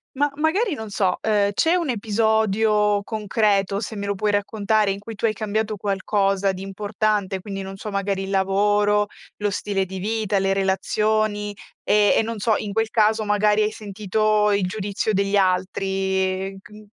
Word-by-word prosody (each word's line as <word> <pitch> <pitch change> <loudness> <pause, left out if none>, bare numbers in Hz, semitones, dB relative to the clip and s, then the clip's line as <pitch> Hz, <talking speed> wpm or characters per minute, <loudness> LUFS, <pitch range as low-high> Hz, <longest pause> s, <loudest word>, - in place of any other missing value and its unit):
Ma 290 +2 +1
magari 335 +7 +1
non 220 -4 -7
so, 190 -2 0
uhm, 205 -2 +2
c'è 325 - +2
un 340 -5 -1
episodio 215 -2 +2
concreto, 205 -2 0
se 220 0 -5
me 200 -1 -4
lo 200 - 0
puoi 210 +2 0
raccontare, 205 0 +1
in 195 - -4
cui 225 +2 -9
tu 210 - -2
hai 220 - +2
cambiato 215 0 -2
qualcosa 195 0 0
di 190 0 -7
importante, 205 0 -1
quindi 195 0 -6
non 195 0 -8
so, 210 - -6
magari 200 -1 -1
il 195 - -6
lavoro, 205 +2 +2 0.3
lo 205 0 -1
stile 195 -1 -1
di 190 +1 -7
vita, 215 0 -1
le 195 0 +1
relazioni 205 +2 0 0.3
e 210 -1 +4
e - - +4
non 225 0 -4
so, 215 +1 +2
in 205 -1 -5
quel 225 +1 0
caso 220 0 +2
magari 210 +1 +2
hai 210 - 0
sentito 210 0 0
il 200 -1 +1
giudizio 205 +2 -2
degli 200 +1 +1
altri 190 0 0
c - - -16
n 210 0 -13
205 Hz, 175 wpm, -22 LUFS, 195-215 Hz, 0.3 s, e